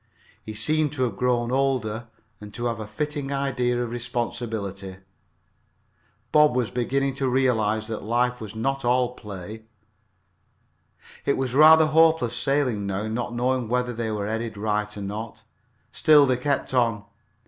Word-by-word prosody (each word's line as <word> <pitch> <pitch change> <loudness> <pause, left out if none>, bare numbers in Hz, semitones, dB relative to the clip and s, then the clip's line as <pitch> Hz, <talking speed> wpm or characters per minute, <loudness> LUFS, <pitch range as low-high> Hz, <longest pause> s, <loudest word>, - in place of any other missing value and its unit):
He 110 - -8
seemed 155 +6 +1
to 130 -3 -1
have 115 -5 -1
grown 120 0 0
older 125 -4 0 0.3
and 105 0 -10
to 120 - -4
have 115 -2 -1
a 110 - -6
fitting 145 +5 -4
idea 125 -3 0
of 120 - -5
responsibility. 115 -5 -4 1.4
Bob 150 -4 +5
was 120 -5 0
beginning 135 +3 0
to 135 -1 -1
realize 110 -5 +1
that 110 -1 -5
life 125 +3 0
was 110 0 -7
not 135 +5 -2
all 125 0 +2
play. 105 -1 -9 1.6
It 140 - +1
was 130 -2 -1
rather 155 +3 +8
hopeless 160 -6 +3
sailing 130 -7 0
now, 100 +2 -2
not 120 +2 -3
knowing 125 0 0
whether 125 0 0
they 115 -1 -3
were 105 -2 -2
headed 110 0 -3
right 105 0 -2
or - - -6
not. 105 +2 -6 0.5
Still 150 -2 +5
they 130 -2 +1
kept 140 +1 -1
on. 115 -5 +1
120 Hz, 150 wpm, -24 LUFS, 110-135 Hz, 1.6 s, rather